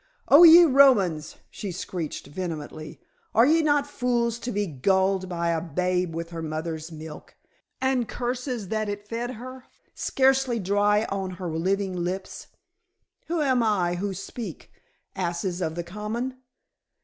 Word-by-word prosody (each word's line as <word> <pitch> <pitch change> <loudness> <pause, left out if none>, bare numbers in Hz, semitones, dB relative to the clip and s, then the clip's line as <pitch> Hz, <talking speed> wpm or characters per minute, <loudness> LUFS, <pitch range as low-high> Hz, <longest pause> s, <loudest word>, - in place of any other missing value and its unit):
"Oh, 290 - +8
ye 340 +1 +10
Romans," 215 - +4 0.2
she 200 -3 -6
screeched 175 -2 -5
vehemently, 155 -1 -6 0.4
"are 230 - +6
ye 320 +4 +4
not 290 -2 +2
fools 240 -4 -1
to 240 +1 -4
be 205 +1 0
gulled 190 +4 +1
by 170 -1 -1
a 165 -1 0
babe 180 +1 -1
with 165 0 -5
her 165 -1 -5
mother's 160 +1 -4
milk 155 -1 -10 0.4
and 265 -3 +1
curses 245 -4 -3
that 215 -1 -1
it 205 0 -6
fed 240 +3 -4
her 255 +3 -10 0.3
scarcely 265 -2 +2
dry 205 +1 +2
on 195 -1 -2
her 180 -2 -4
living 190 +3 -1
lips? 180 +2 -4 0.8
Who 330 -2 0
am 260 -3 +2
I 195 -6 +1
who 190 +2 -3
speak, 205 +5 -8 0.4
asses 175 0 -2
of 160 -2 -2
the 175 - -3
common? 215 +8 -4
195 Hz, 145 wpm, -25 LUFS, 175-245 Hz, 0.8 s, ye